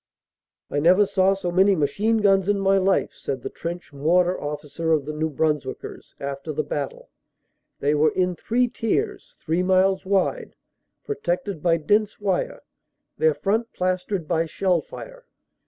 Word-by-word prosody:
"I 145 Hz, -, 0 dB
never 180 Hz, +7 st, +5 dB
saw 190 Hz, 0 st, +2 dB
so 180 Hz, -2 st, -3 dB
many 190 Hz, +2 st, +4 dB
machine 195 Hz, +9 st, +1 dB
guns 195 Hz, -1 st, +3 dB
in 205 Hz, -1 st, +2 dB
my 195 Hz, 0 st, +3 dB
life," 190 Hz, +1 st, +1 dB
said 130 Hz, -3 st, -5 dB
the -, -, -5 dB
Trench 170 Hz, -2 st, -6 dB
Mortar 175 Hz, +6 st, +2 dB
Officer 150 Hz, +2 st, -3 dB
of 150 Hz, -3 st, +1 dB
the 155 Hz, -, -4 dB
New 155 Hz, +1 st, -1 dB
Brunswickers 150 Hz, -2 st, -3 dB
after 140 Hz, +2 st, -5 dB
the 155 Hz, +1 st, -1 dB
battle. 145 Hz, -2 st, -5 dB, 0.7 s
"They 145 Hz, +1 st, +2 dB
were 150 Hz, +1 st, +4 dB
in 180 Hz, -1 st, 0 dB
three 245 Hz, +7 st, +1 dB
tiers, 400 Hz, -, -2 dB
three 165 Hz, +3 st, -1 dB
miles 190 Hz, +1 st, +3 dB
wide, 200 Hz, -, 0 dB, 0.5 s
protected 190 Hz, -, -3 dB
by 170 Hz, 0 st, +3 dB
dense 210 Hz, +6 st, +1 dB
wire, 215 Hz, -, -1 dB, 0.6 s
their 470 Hz, 0 st, +3 dB
front 225 Hz, +4 st, -1 dB
plastered 185 Hz, -1 st, -2 dB
by 165 Hz, -1 st, +1 dB
shell 180 Hz, +1 st, +1 dB
fire. -, -, -11 dB
185 Hz, 155 wpm, -24 LUFS, 155-200 Hz, 0.7 s, never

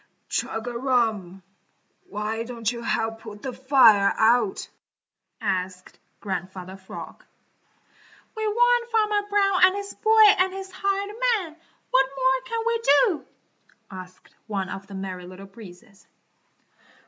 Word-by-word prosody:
"Chug 225 Hz, -, -3 dB
a 240 Hz, -, -5 dB
rum! 220 Hz, -8 st, -1 dB, 0.7 s
Why 210 Hz, +2 st, -3 dB
don't 230 Hz, -2 st, -3 dB
you 235 Hz, -1 st, -7 dB
help 225 Hz, -1 st, -2 dB
put 210 Hz, -2 st, -11 dB
the 260 Hz, -, -4 dB
fire 250 Hz, -7 st, +5 dB
out?" 225 Hz, -2 st, +2 dB, 0.7 s
asked 185 Hz, -3 st, -4 dB, 0.2 s
Grandfather 185 Hz, -1 st, -5 dB
Frog. 190 Hz, -1 st, -10 dB, 1.1 s
"We 440 Hz, 0 st, -2 dB
warned 485 Hz, +2 st, +3 dB
Farmer 425 Hz, -2 st, +1 dB
Brown 395 Hz, -2 st, +2 dB
and 370 Hz, +1 st, +6 dB
his 400 Hz, 0 st, -6 dB
boy 440 Hz, 0 st, +4 dB, 0.2 s
and 370 Hz, 0 st, +2 dB
his 385 Hz, 0 st, -7 dB
hired 395 Hz, +2 st, -2 dB, 0.2 s
man; 325 Hz, -5 st, -9 dB, 0.4 s
what 265 Hz, +1 st, +3 dB
more 260 Hz, 0 st, +1 dB
can 460 Hz, -1 st, -2 dB
we 470 Hz, 0 st, +1 dB
do?" 340 Hz, -, +3 dB, 0.7 s
asked 185 Hz, -1 st, -12 dB
one 195 Hz, -3 st, -3 dB
of 195 Hz, +1 st, -7 dB
the 200 Hz, -, -10 dB
Merry 185 Hz, -2 st, -6 dB
Little 185 Hz, +2 st, -11 dB
Breezes. 195 Hz, 0 st, -15 dB
235 Hz, 130 wpm, -24 LUFS, -, 1.1 s, and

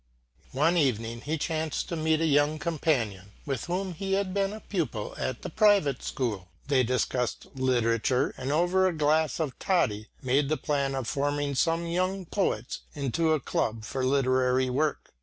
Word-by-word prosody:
One 155 Hz, +6 st, +3 dB
evening 115 Hz, -5 st, 0 dB
he 155 Hz, +4 st, -2 dB
chanced 155 Hz, 0 st, -2 dB
to 170 Hz, -, -2 dB
meet 160 Hz, 0 st, +1 dB
a -, -, +3 dB
young 145 Hz, 0 st, +3 dB
companion 120 Hz, -, -1 dB
with 135 Hz, -5 st, -3 dB
whom 185 Hz, +1 st, -2 dB
he 195 Hz, +3 st, -3 dB
had 195 Hz, -1 st, 0 dB
been 195 Hz, 0 st, +1 dB
a 215 Hz, -, -7 dB
pupil 155 Hz, -, -3 dB
at 130 Hz, -2 st, -3 dB
the -, -, -4 dB
private 200 Hz, -, +3 dB
school. 110 Hz, -9 st, -3 dB, 0.2 s
They 140 Hz, -2 st, +3 dB
discussed 125 Hz, 0 st, -1 dB
literature, 125 Hz, +1 st, +1 dB
and 130 Hz, +2 st, -3 dB
over 180 Hz, +4 st, +3 dB
a 185 Hz, -, 0 dB
glass 155 Hz, +2 st, +2 dB
of 150 Hz, -5 st, -3 dB
toddy 110 Hz, -, +1 dB, 0.2 s
made 135 Hz, +2 st, +2 dB
the 155 Hz, -, +1 dB
plan 140 Hz, -2 st, -1 dB
of 130 Hz, -3 st, -3 dB
forming 145 Hz, +1 st, -1 dB
some 165 Hz, +5 st, +1 dB
young 185 Hz, +2 st, -1 dB
poets 145 Hz, -, -1 dB, 0.2 s
into 155 Hz, +3 st, +1 dB
a 155 Hz, -, +1 dB
club 110 Hz, -4 st, -2 dB
for 130 Hz, +4 st, -3 dB
literary 130 Hz, -1 st, +2 dB
work. 150 Hz, +4 st, -1 dB
145 Hz, 170 wpm, -28 LUFS, 130-165 Hz, 0.2 s, One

